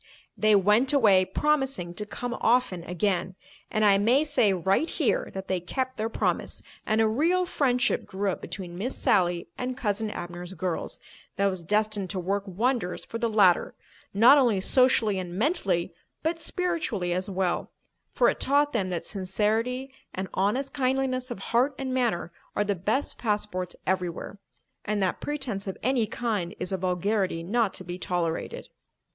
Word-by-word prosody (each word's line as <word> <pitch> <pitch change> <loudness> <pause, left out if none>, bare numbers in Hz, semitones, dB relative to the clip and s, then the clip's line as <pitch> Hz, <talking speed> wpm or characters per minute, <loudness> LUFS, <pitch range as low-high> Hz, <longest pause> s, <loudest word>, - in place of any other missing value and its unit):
They 215 -1 +4
went 210 +8 +4
away 200 -9 +5
promising 270 - 0
to 210 +3 -4
come 240 +4 -4
often 225 -7 +2
again; 180 0 -1 0.3
and 215 0 +1
I 200 -1 +5
may 245 +8 +4
say 290 -9 +2
right 190 - +1
here - - 0
that 190 0 -5
they 185 -1 0
kept 260 +9 -3
their 220 +1 -1
promise, - - -1 0.2
and 215 +1 +2
a 225 - +4
real 335 +11 +2
friendship 250 -8 +1
grew 195 +1 -1
up - - -6
between 180 -3 -7
Miss 250 +6 -3
Sally 175 -1 +2
and 255 0 -3
"Cousin 215 -2 0
Abner's 175 -1 -6
girls" 185 -3 -3 0.4
that 200 - +1
was 185 -3 -1
destined 210 +1 0
to 190 - -2
work 200 +3 -2
wonders 215 0 -1
for 230 - -5
the 230 0 +1
latter, 200 -5 +4 0.4
not 235 +8 +7
only 235 -7 +3
socially 220 -2 +3
and 180 -1 -6
mentally 190 - 0 0.3
but 325 +1 0
spiritually 325 - -1
as 185 +2 -2
well, 185 -2 -1 0.4
for - - +3
it - - +1
taught 285 +2 +2
them 195 -6 0
that 175 -2 -3
sincerity 220 +7 -1 0.2
and 190 +1 -3
honest 230 +8 0
kindliness 260 -2 0
of 240 - -5 0.2
heart 260 +4 +3
and 265 -1 -3
manner 230 -10 0 0.2
are 205 - +2
the 205 0 0
best 210 +10 -1
passports 210 -5 -2
everywhere, 185 +1 -2 0.4
and 210 0 -1
that 185 - -1
pretence 255 -10 -3
of 190 - -4
any 245 -2 +2
kind 210 -5 -2
is 185 - -3
a 190 - 0
vulgarity 185 0 0
not 215 +3 +1
to - - -7
be 175 +1 -6
tolerated. 170 -3 -2
210 Hz, 165 wpm, -27 LUFS, 185-250 Hz, 0.4 s, not